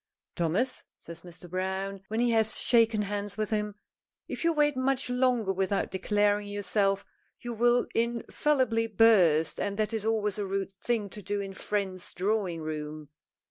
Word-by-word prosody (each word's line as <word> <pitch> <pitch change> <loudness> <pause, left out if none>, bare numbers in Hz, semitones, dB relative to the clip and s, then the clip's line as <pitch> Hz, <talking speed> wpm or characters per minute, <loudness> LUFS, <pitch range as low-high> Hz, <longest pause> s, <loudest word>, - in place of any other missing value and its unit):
"Thomas," 185 +10 0 0.2
says 170 0 -11
Mr. 175 0 -12
Browne, 190 +2 -3
when 220 +1 -2
he 240 0 +3
has 220 -1 +2
shaken 225 -3 +3
hands 205 0 -4
with 215 0 -2
him, 210 -1 -1 0.5
"if - - -5
you 335 - +4
wait 295 -2 +2
much 260 0 0
longer 250 -5 +2
without 195 +1 -1
declaring 205 +2 +1
yourself 200 -1 0 0.3
you 240 -1 -5
will 240 +2 +3
infallibly 235 0 +1
burst, 185 -8 +4
and 200 0 -2
that 215 0 0
is 220 -2 -2
always 215 -2 0
a 205 - -1
rude 195 0 -2
thing 210 +2 -2
to 210 - -8
do 205 +2 -2
in 195 -1 -4
a - - -10
friend's 190 -2 -3
drawing 185 -4 -1
room. 155 -1 -5
205 Hz, 165 wpm, -29 LUFS, 190-230 Hz, 0.5 s, you